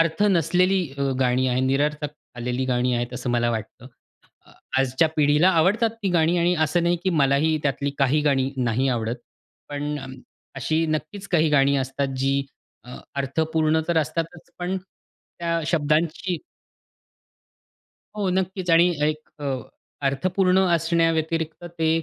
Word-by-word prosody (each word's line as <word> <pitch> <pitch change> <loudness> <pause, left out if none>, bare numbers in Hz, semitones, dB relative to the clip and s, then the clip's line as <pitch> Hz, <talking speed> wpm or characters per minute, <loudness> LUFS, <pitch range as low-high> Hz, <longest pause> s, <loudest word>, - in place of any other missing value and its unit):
अर्थ 165 +4 +1
नसलेली 180 +3 +2 0.2
अ, - - -1 0.2
गाणी 130 0 +2
आहेत 125 +1 +1
निरर्थक 150 +2 0 0.2
आलेली 125 +2 -2
गाणी 125 0 +1
आहेत 120 +1 -2
असं 125 0 -3
मला 120 0 +1
वाटतं. 110 +2 -6 0.6
अ, - - -20 0.3
आजच्या 135 +4 +2
पिढीला 150 +4 +4
आवडतात 190 +7 +3
ती 195 - +1
गाणी 170 0 +3
आणि 175 +1 +2
असं 170 +3 0
नाही 175 0 +2
की 190 - +2
मलाही 150 0 +2
त्यातली 140 0 0
काही 140 +2 +3
गाणी 135 -2 +1
नाही 125 +1 +1
आवडत. 115 -1 -1 0.5
पण 145 +1 -3
अ, 135 - -8 0.5
अशी 155 +5 0
नक्कीच 155 +6 -4
काही 160 -3 +3
गाणी 140 -1 +4
असतात 135 +1 -2
जी 135 +1 +1 0.4
अ, 125 0 -10 0.2
अर्थपूर्ण 155 +3 +1
तर 170 -1 +1
असतातच 165 +2 -3
पण 180 +2 -2
त्या 170 -2 -6
शब्दांची 160 +3 0 1.8
हो, 205 -2 -1
नक्कीच 185 0 -1
आणि 170 +2 +5
एक 155 +1 -1
अ, - - -4 0.6
अर्थपूर्ण 185 +7 +2 0.2
असण्याव्यतिरिक्त 165 -1 0
ते 160 -1 +2
155 Hz, 140 wpm, -24 LUFS, 135-170 Hz, 1.8 s, आणि